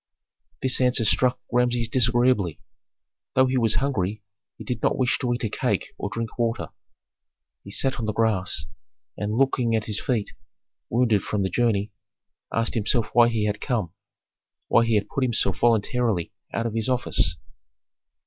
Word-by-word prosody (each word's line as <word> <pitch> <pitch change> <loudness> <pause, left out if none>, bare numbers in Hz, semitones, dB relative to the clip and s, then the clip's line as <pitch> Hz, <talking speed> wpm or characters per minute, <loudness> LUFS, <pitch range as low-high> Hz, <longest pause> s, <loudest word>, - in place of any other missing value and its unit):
This 130 0 +2
answer 125 -2 +3
struck 125 +4 +2
Rameses 120 -1 +2
disagreeably. 120 - +2 0.8
Though 130 - +5
he 130 0 -1
was 115 -2 +2
hungry, 110 -7 -1 0.3
he - - -9
did 120 -3 -4
not - - +1
wish 125 -2 +1
to 125 - -1
eat 120 +1 -2
a 110 - 0
cake - - -2
or 100 - -4
drink 115 +3 -5
water. 115 -1 -1 0.9
He - - -11
sat 130 +6 0
on 110 - -2
the - - +1
grass, 105 -4 0 0.5
and 105 +1 -3
looking 125 -3 +2
at 110 -1 -1
his 105 -1 -2
feet 120 -7 -1 0.6
wounded 115 -4 +2
from 105 -2 -2
the 95 - -1
journey, 110 -2 +1 0.6
asked 115 0 0
himself 115 +1 0
why 120 -1 +6
he 110 -3 0
had 105 0 -2
come, 110 - -2 0.8
why 115 - +5
he 115 -1 +2
had 105 -1 +1
put 135 - -2
himself 115 -6 +1
voluntarily 115 -4 +1 0.2
out 115 - -2
of 115 - -2
his 115 +1 -1
office. 105 -9 +1
115 Hz, 165 wpm, -24 LUFS, 105-125 Hz, 0.9 s, why